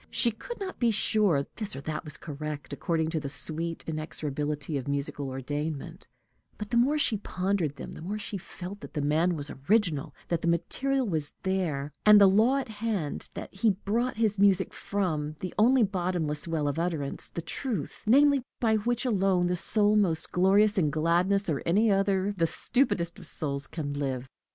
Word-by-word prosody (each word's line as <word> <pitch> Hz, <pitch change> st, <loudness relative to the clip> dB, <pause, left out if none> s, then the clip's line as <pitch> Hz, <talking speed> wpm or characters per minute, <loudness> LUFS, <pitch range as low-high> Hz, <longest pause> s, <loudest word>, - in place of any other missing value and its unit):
She 235 Hz, -, +3 dB
could 475 Hz, -, -8 dB
not 385 Hz, -1 st, -6 dB
be 240 Hz, -, +3 dB
sure 205 Hz, -8 st, +2 dB
this 215 Hz, -, -4 dB
or 135 Hz, -, -6 dB
that 150 Hz, +2 st, -4 dB
was 150 Hz, -1 st, -7 dB
correct, 150 Hz, -1 st, -6 dB
according 160 Hz, +2 st, -1 dB
to 160 Hz, -, 0 dB
the 140 Hz, -2 st, -5 dB
sweet 165 Hz, +3 st, -2 dB
inexorability 150 Hz, -1 st, -3 dB
of 135 Hz, -1 st, -3 dB
musical 140 Hz, 0 st, -2 dB
ordainment, 145 Hz, +3 st, -5 dB, 0.5 s
but 210 Hz, -1 st, -7 dB
the 235 Hz, -, +2 dB
more 270 Hz, +6 st, +3 dB
she 235 Hz, -7 st, +2 dB
pondered 185 Hz, -6 st, -1 dB
them, -, -, -8 dB
the -, -, -10 dB
more 200 Hz, +6 st, -3 dB
she 205 Hz, -1 st, -4 dB
felt 185 Hz, +3 st, -8 dB
that -, -, -11 dB
the 150 Hz, -, 0 dB
man 160 Hz, +5 st, +2 dB
was 145 Hz, -1 st, -5 dB, 0.2 s
original, 180 Hz, -9 st, +2 dB
that 170 Hz, -2 st, 0 dB
the -, -, -1 dB
material 260 Hz, +10 st, 0 dB
was 155 Hz, -6 st, -2 dB
there, 160 Hz, -7 st, -1 dB
and 210 Hz, -1 st, +8 dB
the 200 Hz, -, +8 dB
law 220 Hz, +8 st, +4 dB
at 275 Hz, -, -2 dB
hand, 210 Hz, -8 st, -3 dB
that -, -, -7 dB
he 200 Hz, +4 st, +2 dB
brought 220 Hz, +5 st, -1 dB
his 215 Hz, -3 st, +1 dB
music 200 Hz, -2 st, +3 dB
from 155 Hz, -7 st, -2 dB
the 185 Hz, -, -5 dB
only 245 Hz, +3 st, +5 dB
bottomless 175 Hz, -6 st, -1 dB
well 160 Hz, -3 st, -1 dB
of 145 Hz, +3 st, -1 dB
utterance, 160 Hz, -5 st, -2 dB
the -, -, -6 dB
truth, 220 Hz, -, -4 dB
namely, 280 Hz, +3 st, +5 dB, 0.2 s
by 220 Hz, -2 st, +3 dB
which 240 Hz, +4 st, -1 dB
alone 195 Hz, -6 st, +2 dB
the 180 Hz, 0 st, +1 dB
soul 210 Hz, +3 st, +4 dB
most 175 Hz, -7 st, +1 dB
glorious 200 Hz, +3 st, +4 dB
in 155 Hz, -4 st, +2 dB
gladness, 175 Hz, +6 st, +1 dB
or 150 Hz, -5 st, -1 dB
any 210 Hz, +6 st, +3 dB
other 195 Hz, 0 st, +1 dB
the 165 Hz, -2 st, +2 dB
stupidest 170 Hz, -7 st, 0 dB
of -, -, -3 dB
souls, 140 Hz, -2 st, -1 dB
can 145 Hz, -3 st, -4 dB
live. 135 Hz, -3 st, -3 dB
180 Hz, 185 wpm, -28 LUFS, 150-210 Hz, 0.5 s, and